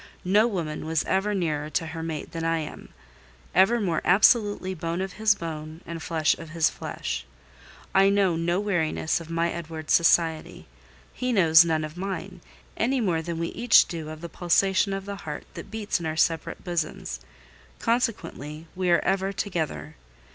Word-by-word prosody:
No 205 +5 +4
woman 160 -8 -3
was 160 -1 +1
ever 200 +2 0
nearer 155 -5 -1
to 165 - -1
her 160 0 -6
mate 160 -2 -5
than 165 -1 -4
I 165 0 +1
am: 155 -2 -7 0.6
ever 195 +7 +4
more 175 -7 0
absolutely 205 0 +4
bone 170 0 -3
of 190 0 -3
his 215 -1 +3
bone 160 -2 -7
and 165 -1 -6
flesh 160 -2 +1
of 165 - -9
his 165 0 +2
flesh. - - -5 0.7
I 195 +1 +5
know 200 -3 +3
no 170 +2 0
weariness 175 -5 0
of 165 - -11
my 165 +1 0
Edward's 160 -2 -4
society: 165 -1 +2 0.5
he 250 0 -2
knows 165 -7 +7
none 160 -2 0
of 155 +2 -7
mine, 190 -1 -5 0.3
any 260 +4 +1
more 175 -8 +1
than 170 0 -4
we 165 0 -2
each 240 -1 +5
do 160 -3 -6
of 155 0 -8
the 170 - -5
pulsation 190 +4 +2
of 195 0 -4
the 200 0 -5
heart 150 -6 -7
that - - -9
beats 215 -4 -2
in 165 - -4
our 155 0 -3
separate 160 0 0
bosoms; 170 -3 -3 0.6
consequently, 165 - -2
we 185 -1 0
are 170 - +4
ever 195 0 +1
together. 155 - -3
170 Hz, 175 wpm, -26 LUFS, 160-195 Hz, 0.7 s, knows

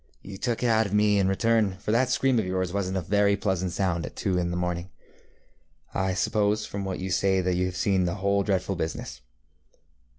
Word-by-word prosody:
ŌĆ£You 95 0 -8
took 120 -1 -1
it - - +3
out 110 -2 +3
of 100 - -2
me 105 -1 +4
in 95 - +2
return, 105 0 +1
for 105 - -3
that 125 +3 +2
scream 130 -1 +2
of 110 - -1
yours 95 -1 -1
wasnŌĆÖt 95 -1 -2
a - - 0
very 100 +3 +2
pleasant 95 -4 -1
sound 90 -2 -1
at - - -7
two 95 - -1
in 90 -1 0
the 90 - -2
morning. 90 0 -2 1.0
I 95 -1 0
suppose 105 +2 +1
from 100 0 -5
what 95 -1 -3
you 95 0 -4
say 95 +1 +2
that 90 0 0
you 90 +1 0
have 90 - -5
seen 95 -3 +2
the 85 +2 -1
whole 100 0 +1
dreadful 95 0 -1
business. 80 -5 -5
95 Hz, 220 wpm, -26 LUFS, 90-105 Hz, 1.0 s, me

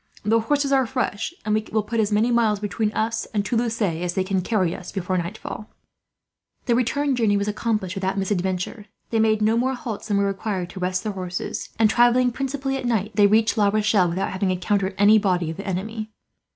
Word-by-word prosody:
The 220 +2 +3
horses 280 +4 0
are 265 -3 +3
fresh, 225 0 -2
and 210 - +1
we 215 0 +1
will 215 -1 +1
put 230 +2 -2
as 215 -1 +1
many 215 +4 +2
miles 225 -3 +2
between 210 +1 -1
us 225 +1 -1
and 200 -1 +1
Toulouse 230 0 0
as 175 -1 -1
they 190 - +1
can 190 0 0
carry 185 -3 0
us, 180 - -9
before 185 -1 -2
nightfall." 185 +4 -5 1.0
The 240 - +2
return 265 +4 +1
journey 220 -4 +2
was 200 +1 -1
accomplished 210 -3 -1
without 195 0 -2
misadventure. 190 +2 -2 0.2
They 225 - +1
made 215 -1 +3
no 220 +2 +3
more 260 +2 +1
halts 225 -4 -6
than 205 -2 +1
were 200 - +2
required 195 -2 -3
to 190 - -8
rest 185 0 -1
their 215 - -3
horses 180 -2 -4
and, 220 0 +5
travelling 245 +2 +4
principally 270 +1 -2
at 260 - -5
night, 220 -3 0
they 205 0 +5
reached 220 +2 +2
La 205 - +4
Rochelle 210 -3 +2
without 180 +3 -2
having 190 0 -1
encountered 190 +1 0
any 210 +2 +6
body 180 -5 0
of 160 - -8
the 200 - -7
enemy. 215 +4 -3
210 Hz, 210 wpm, -23 LUFS, 190-230 Hz, 1.0 s, any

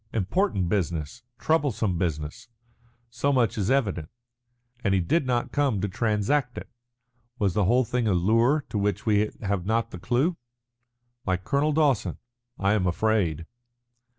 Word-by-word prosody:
Important 110 - 0
business, 85 - -2 0.2
troublesome 115 - 0
business 80 +6 -3 0.6
so 125 +4 0
much 120 -7 +2
is 100 -2 -1
evident. 100 - 0 0.7
And 95 - +2
he - - +3
did 130 - +1
not 120 -1 0
come 140 -8 +1
to 100 - -1
transact 115 +6 0
it. - - -6 0.7
Was 100 -6 +1
the 105 -2 +2
whole 125 +5 +3
thing 120 0 -1
a 100 - +2
lure 115 - +2
to 105 - -2
which 100 0 -1
we 105 -1 +2
have 100 -3 -1
not 115 +1 0
the 90 - -8
clue? 130 - 0 0.9
Like 95 0 0
Colonel 140 +8 +1
Dawson, 145 -7 +1 0.4
I 100 +1 +2
am 95 -4 +1
afraid." 90 -4 0
110 Hz, 150 wpm, -26 LUFS, 95-125 Hz, 0.9 s, he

